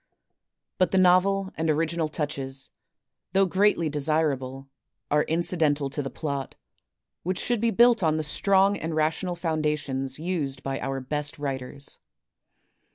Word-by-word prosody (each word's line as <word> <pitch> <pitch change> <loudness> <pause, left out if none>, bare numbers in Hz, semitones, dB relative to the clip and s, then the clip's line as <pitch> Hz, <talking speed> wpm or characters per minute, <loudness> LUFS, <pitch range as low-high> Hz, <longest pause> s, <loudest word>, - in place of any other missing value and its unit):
But 185 -2 +4
the 190 - +2
novel 190 +1 +4
and 160 0 -1
original 160 +1 +1
touches, 135 -3 -4 0.6
though 195 0 +5
greatly 190 -2 +2
de 150 0 -2
sirable, 135 -3 0 0.4
are 150 +1 +4
incidental 155 -4 +1
to 145 - -2
the 135 - -4
plot, 140 -4 -4 0.7
which 185 +1 -2
should 240 -3 0
be 230 - +3
built 235 -1 +5
on 155 -2 +2
the 155 - -1
strong 195 +6 +3
and 160 0 -4
rational 160 +4 0
foundations 150 -5 -1
used 150 -5 -3
by 135 0 -2
our 135 0 -3
best 145 +2 -2
writers. 140 -1 -4
155 Hz, 140 wpm, -26 LUFS, 140-180 Hz, 0.7 s, though